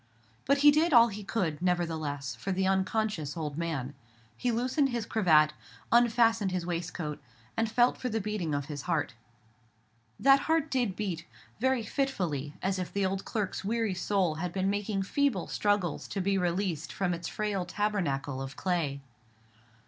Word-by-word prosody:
But 280 +1 +4
he 295 - +10
did 310 +2 +2
all 235 -1 +8
he 210 0 -7
could, 180 -8 -2
nevertheless, 160 -7 -1
for 120 +12 -4
the 190 0 +1
unconscious 190 -4 0
old 150 -3 -3
man. 150 -5 -3 0.4
He 245 - 0
loosened 255 +5 +1
his 235 -3 -2
cravat, 155 -9 +4 0.4
unfastened 230 -3 +4
his 180 -2 -2
waistcoat, 170 -3 -4 0.3
and 225 0 +1
felt 240 +2 +3
for 255 - -2
the 225 -1 -1
beating 195 -7 -2
of 145 -1 -2
his 145 -1 -5
heart. 165 -5 0 1.1
That 275 +1 +6
heart 320 -2 +2
did 245 -8 0
beat: 180 -6 -4 0.3
very 260 -1 +2
fitfully, 180 - -2
as 190 0 0
if 180 - -4
the 200 -1 0
old 190 +1 -2
clerk's 210 -4 -2
weary 225 0 0
soul 185 -2 +1
had 170 +3 -3
been 190 +1 0
making 205 -1 -1
feeble 255 -2 +1
struggles 205 -6 0
to 200 - -4
be 195 +1 +1
released 180 -3 -1
from 180 -2 -1
its 170 0 -4
frail 210 -3 -2
tabernacle 170 -9 -1
of 135 0 -6
clay. 160 -7 -1
190 Hz, 165 wpm, -30 LUFS, 165-225 Hz, 1.1 s, he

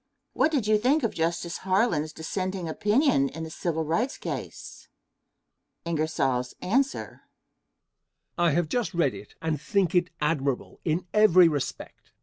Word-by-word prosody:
What 315 - +2
do 305 - +2
you 215 -3 +2
think 270 +6 +2
of 230 - 0
Justice 170 +1 -2
Harlan's 185 -5 +1
dissenting 185 +3 -4
opinion 205 - +2
in 160 - -7
the 160 - -7
Civil 160 -1 -2
Rights 220 - -1
case? - - -7 1.0
Answer. 160 - -1 1.1
I 175 -1 +3
have 165 +2 +1
just 230 +1 -2
read 170 - +2
it - - -11
and 155 -3 -1
think 195 -3 +1
it 180 0 +2
admirable 145 -4 -1
in 165 +2 -1
every 185 -5 +6
respect. 145 -4 -5
170 Hz, 130 wpm, -26 LUFS, 155-210 Hz, 1.1 s, every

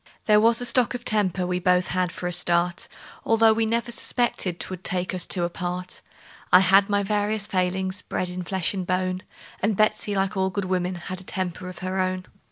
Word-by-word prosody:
There 210 -1 +5
was 230 +1 +4
a 245 - -2
stock 245 -1 +3
of 245 0 -7
temper 195 -5 +1
we 180 0 -1
both 180 0 +2
had 180 -1 0
for 185 - -8
a 175 - -1
start, 175 0 +1 0.4
Although 225 0 +4
we 225 0 0
never 235 +1 -1
suspected 230 -7 0
'twould 185 -1 -6
take 180 0 -1
us 180 -2 +1
two 180 - +3
apart; 180 +1 -4 0.5
I 180 - +9
had 195 +2 +5
my 205 0 +1
various 210 +1 0
failings, 185 0 -1
bred 185 -1 -3
in 180 0 -4
the 180 - -5
flesh 190 0 -1
and 185 -3 -4
bone; 185 0 -1 0.4
And 205 0 0
Betsey, 215 -1 +1
like 195 +1 0
all 190 0 +1
good 200 0 -3
women, 185 0 -1
had 185 +2 -6
a - - -11
temper 185 -1 -4
of 185 - -10
her 185 +1 -2
own. 185 0 -1
185 Hz, 210 wpm, -24 LUFS, 180-205 Hz, 0.5 s, I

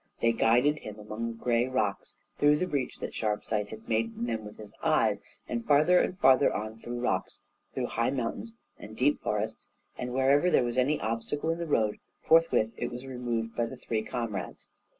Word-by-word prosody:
They 115 - +3
guided 125 +6 +3
him 105 -1 -8
among 105 +2 -5
the 115 -1 -6
gray 120 +1 +1
rocks 110 -6 -2 0.2
through 145 0 +5
the 180 - 0
breach 145 -7 -2
that - - -6
Sharpsight 105 -1 -1
had 110 0 -10
made 115 0 0
in - - -2
them 110 -2 -3
with 105 - -10
his 105 -2 -11
eyes, - - +2 0.3
and 120 -1 -3
farther 155 +6 +5
and 185 - 0
farther 135 -3 +5
on 110 +1 -4
through 120 +1 -5
rocks, 95 -7 -1 0.4
through - - -1
high 115 - 0
mountains 140 - -3 0.2
and 110 +1 -10
deep 145 +3 +2
forests, 105 +1 -3 0.3
and 125 - -3
wherever 135 +6 +3
there 130 - +4
was 120 +1 0
any 145 +4 +2
obstacle 115 +8 -2
in 165 - -3
the 170 - -3
road, 110 -8 +1 0.2
forthwith 160 -9 +4
it - - -2
was 125 +2 -7
removed 120 -3 -3
by 120 -1 0
the - - -8
three 110 -2 -2
comrades. 110 -5 -5
120 Hz, 195 wpm, -29 LUFS, 110-135 Hz, 0.4 s, through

